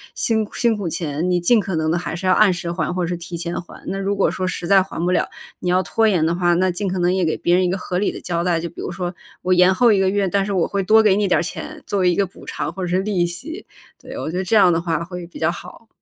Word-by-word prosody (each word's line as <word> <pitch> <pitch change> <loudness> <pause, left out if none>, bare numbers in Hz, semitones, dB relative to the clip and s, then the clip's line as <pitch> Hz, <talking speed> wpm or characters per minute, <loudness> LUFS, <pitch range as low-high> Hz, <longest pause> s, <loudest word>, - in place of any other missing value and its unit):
辛 220 -2 0
辛 235 -2 +2
苦 200 -4 -3
钱， 160 +1 -2
你 180 -1 +2
尽 225 +7 +4
可 195 -3 -3
能 160 0 0
地 170 - +1
还 175 - -4
是 180 +3 -6
要 185 - +4
按 215 -1 +5
时 175 -1 -4
还 165 -3 -2
或 180 -1 0
者 175 +1 -2
提 170 0 -7
前 170 0 -4
还。 175 - -14
那 195 - -3
如 195 +1 -1
果 195 - +2
说 185 - -2
实 180 - -4
在 195 +1 +6
还 185 -3 -5
不 180 - +1
了， 180 - +1 0.3
你 180 - -2
要 185 +1 +3
拖 225 +4 +1
延 180 -7 +2
的 165 - +1
话， 175 -1 +2
那 185 +1 +2
尽 185 +3 -3
可 185 0 -2
能 175 +1 +2
也 190 -1 +1
给 160 - 0
别 175 - +1
人 185 0 +3
一 - - +1
个 185 - -1
合 180 -1 -3
理 205 - +1
的 - - -7
交 170 -1 -2
代， 175 -2 +1
就 170 - -4
比 170 - -22
如 - - -4
说 180 -1 -4 0.3
我 185 - +2
延 180 +1 +5
后 240 +2 +5
1 200 - +3
个 190 -1 +3
月， 200 0 +1
但 200 +1 +1
是 200 - -3
我 180 -3 +1
会 200 - -1
多 220 +4 +5
给 205 -3 +4
你 205 -1 +1
点 180 - +3
儿 - - -1
钱 310 - -7
作 200 - -1
为 180 -1 +3
一 175 - +1
个 200 - +2
补 185 - -15
偿 - - -4
或 190 - -7
者 - - -2
是 180 +1 +1
利 195 -4 +1
息， 315 - -7 0.4
对， 260 +1 -9
我 160 - -4
觉 180 - -3
得 190 - -1
这 205 - +1
样 190 -4 +6
的 165 - 0
话 165 -1 -1
会 180 0 -7
比 170 - -12
较 160 +1 +2
好。 180 +6 -11
180 Hz, 345 characters per minute, -20 LUFS, 175-195 Hz, 0.4 s, 在